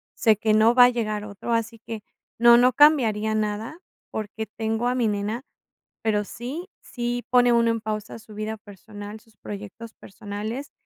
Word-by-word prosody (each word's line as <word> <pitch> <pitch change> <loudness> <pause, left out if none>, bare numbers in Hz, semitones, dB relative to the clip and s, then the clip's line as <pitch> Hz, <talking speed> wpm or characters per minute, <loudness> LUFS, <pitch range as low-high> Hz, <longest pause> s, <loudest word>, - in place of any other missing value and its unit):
sé 220 -2 +4
que 215 +1 +1
no 220 +2 +5
va 245 0 +8
a - - +5
llegar 215 -4 -2
otro, 210 +3 -5
así 230 0 -1
que 225 -2 -6 0.4
no, 235 0 +8
no 250 +1 +4
cambiaría 225 -8 +4
nada 215 +6 -2 0.3
porque 220 +1 -5
tengo 225 +2 -2
a 250 - +1
mi 240 -3 +1
nena. 210 +4 -2 0.6
Pero 210 -2 +1
sí, 260 - -7
sí 240 0 -4
pone 245 -1 +5
uno 235 0 +3
en 230 -1 -2
pausa 215 -1 -4
su 215 -1 -15
vida 215 +1 -4
personal, 205 0 -10
sus 220 -1 -26
proyectos 210 +3 -9
personales, 210 +7 -7
220 Hz, 170 wpm, -24 LUFS, 210-240 Hz, 0.6 s, va